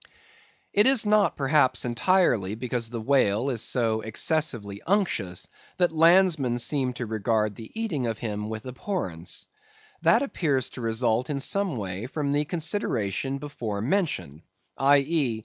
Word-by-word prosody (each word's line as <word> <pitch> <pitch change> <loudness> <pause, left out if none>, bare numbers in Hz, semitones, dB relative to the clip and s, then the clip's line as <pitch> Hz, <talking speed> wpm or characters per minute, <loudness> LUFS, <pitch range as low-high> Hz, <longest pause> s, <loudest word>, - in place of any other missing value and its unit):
It 205 +4 +5
is 265 -5 +5
not, 210 -1 +3
perhaps, 135 -3 +2
entirely 120 - +2
because 120 -1 -3
the 120 0 -5
whale 120 0 +2
is 115 -4 -2
so 115 -3 0
excessively 110 -4 -1
unctuous 165 - 0 0.3
that 175 -2 +2
landsmen 165 -6 +4
seem 130 +1 0
to 125 0 -5
regard 110 -1 0
the 110 +2 -10
eating 155 - -1
of 115 -2 -2
him 105 -1 -4
with 110 +1 -6
abhorrence; 125 - -4 0.6
that - - +4
appears 140 - 0
to - - -8
result, 115 +1 0
in 140 -2 -2
some 190 +1 +1
way, 100 +2 -4
from 145 +1 -2
the 145 +1 +1
consideration 140 - -2
before 120 -8 -5
mentioned: 125 - -1 0.4
_i.e. 140 -3 +2
125 Hz, 140 wpm, -26 LUFS, 110-155 Hz, 0.6 s, It